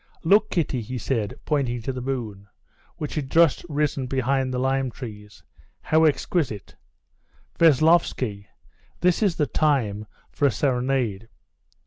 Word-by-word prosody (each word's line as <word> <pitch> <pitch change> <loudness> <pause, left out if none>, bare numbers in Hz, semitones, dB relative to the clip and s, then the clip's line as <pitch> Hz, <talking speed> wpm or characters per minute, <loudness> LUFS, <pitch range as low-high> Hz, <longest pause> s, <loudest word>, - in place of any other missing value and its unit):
"Look, 205 +6 +4
Kitty," 145 -7 -1
he 125 +4 -6
said, 110 -3 -2
pointing 125 -6 -1
to 135 - -3
the 125 - -5
moon, 115 -7 -5 0.5
which 150 - -5
had 145 -4 -3
just 165 -2 +4
risen 145 -3 -1
behind 130 0 0
the 125 - -2
lime 135 +1 0
trees—"how 115 +7 -4
exquisite! 145 - -1 0.8
Veslovsky, 150 -9 +3 0.5
this 180 +2 +2
is 195 -6 +2
the 150 - +1
time 115 -10 0 0.2
for 145 - +2
a - - +2
serenade. 125 -3 -1
135 Hz, 125 wpm, -24 LUFS, 115-150 Hz, 0.8 s, Look